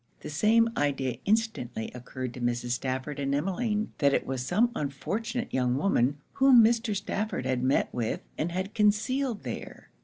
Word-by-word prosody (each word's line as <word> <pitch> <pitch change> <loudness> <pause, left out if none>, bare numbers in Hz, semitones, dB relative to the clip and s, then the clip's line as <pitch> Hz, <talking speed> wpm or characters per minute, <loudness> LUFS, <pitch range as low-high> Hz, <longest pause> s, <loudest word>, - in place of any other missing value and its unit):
The - - -7
same 225 +8 +4
idea 135 -4 0
instantly 200 - -1
occurred 125 0 -6
to 125 - -8
Mrs. 120 0 -1
Stafford 130 +3 -2
and 140 0 0
Emmeline; 210 +7 -1
that 140 -2 +4
it - - 0
was 130 -2 -3
some 235 - +2
unfortunate 225 - -3
young 125 -1 +1
woman, 140 -5 +2 0.2
whom 265 -4 +7
Mr. 225 -1 +2
Stafford 200 - -2
had 130 -1 0
met 130 +2 +1
with 115 -3 -2
and 165 +3 -2
had 185 +3 -3
concealed 220 +3 +1
there. 115 - -7
150 Hz, 160 wpm, -28 LUFS, -, 0.2 s, whom